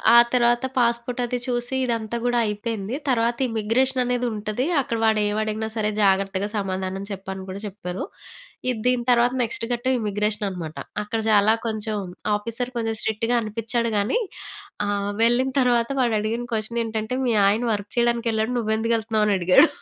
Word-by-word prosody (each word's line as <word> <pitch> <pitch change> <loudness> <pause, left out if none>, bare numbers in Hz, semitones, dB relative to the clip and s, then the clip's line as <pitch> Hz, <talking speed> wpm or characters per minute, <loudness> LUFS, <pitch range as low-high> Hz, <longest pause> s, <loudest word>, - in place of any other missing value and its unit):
ఆ - - +10 0.2
తర్వాత 240 0 +3
పాస్‌పోర్టది 240 +1 0
చూసి 245 +1 -1
ఇదంతా 230 -1 -2
గూడా 245 0 +2
అయిపోయింది. 210 +1 -3
తర్వాత 235 -1 +2
ఇమ్మిగ్రేషననేదుంటది, 245 0 0 0.2
అక్కడ 235 -3 -3
వాడేమడిగినా 215 0 +1
సరే 215 -1 +1
జాగ్రత్తగా 195 0 +2
సమాధానం 190 -1 -3
చెప్పు 190 -1 -7
అని 190 0 -7
కూడా 190 +1 -5
చెప్పారు. 185 -2 -5 0.7
ఇది 245 -3 -1
దీని 250 -1 +2
తర్వాత 240 +1 +4
నెక్స్ట్ 230 0 -2
గట్టం 250 +2 0
ఇమ్మిగ్రేషననమాట. 205 -6 -1 0.3
అక్కడ 215 +2 -3
చాలా 210 +1 +5
కొంచం 215 -1 -2 0.4
ఆఫీసర్ 230 +4 -3
కొంచం 225 -1 -1
స్ట్రిక్ట్‌గా 225 +2 0
అనిపిచ్చాడు 230 +2 -1
గానీ, 205 - +1 0.7
ఆహ్ 205 0 -1
వెళ్ళిన 245 +3 +3
తర్వాత 240 -2 +2
వాడడిగిన 230 0 0
క్వషనేంటంటే, 225 +1 -2
మీ 235 - +2
ఆయన 210 +4 +2
వర్క్ 205 0 -4
చెయ్యడానికెళ్ళాడు, 235 -1 +1
నువ్వెందుకెళ్తన్నావనడిగాడు. 220 - +3
225 Hz, 125 wpm, -23 LUFS, 210-240 Hz, 0.7 s, ఆ